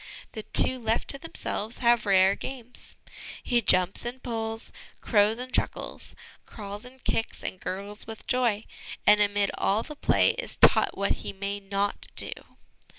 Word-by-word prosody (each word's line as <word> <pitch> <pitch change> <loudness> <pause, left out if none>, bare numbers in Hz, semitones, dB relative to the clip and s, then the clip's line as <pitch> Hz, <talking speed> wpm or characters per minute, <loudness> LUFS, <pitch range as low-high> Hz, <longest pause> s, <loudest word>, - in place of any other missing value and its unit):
The 220 - -6
two 255 +4 +5
left 225 -1 -1
to 275 - 0
themselves 230 -8 -3
have 235 -3 +2
rare 190 0 +5
games. 250 -2 -9 0.5
He 240 -1 +2
jumps 185 -2 +4
and 245 +2 -6
pulls, 225 -1 -3 0.3
crows 210 0 +2
and 255 +1 -7
chuckles, - - -3 0.3
crawls 205 0 -9
and 255 0 -15
kicks 225 - -2
and 185 - -5
gurgles 200 +4 -5
with 225 -1 -9
joy; 235 -4 +1 0.4
and, 210 0 +6
amid 205 -1 +1
all 210 +3 +1
the 300 - -9
play, - - +3
is - - -6
taught - - +4
what 200 0 0
he - - -6
may 200 +1 -4
not 200 0 -2
do. - - -2
220 Hz, 155 wpm, -27 LUFS, 200-240 Hz, 0.5 s, and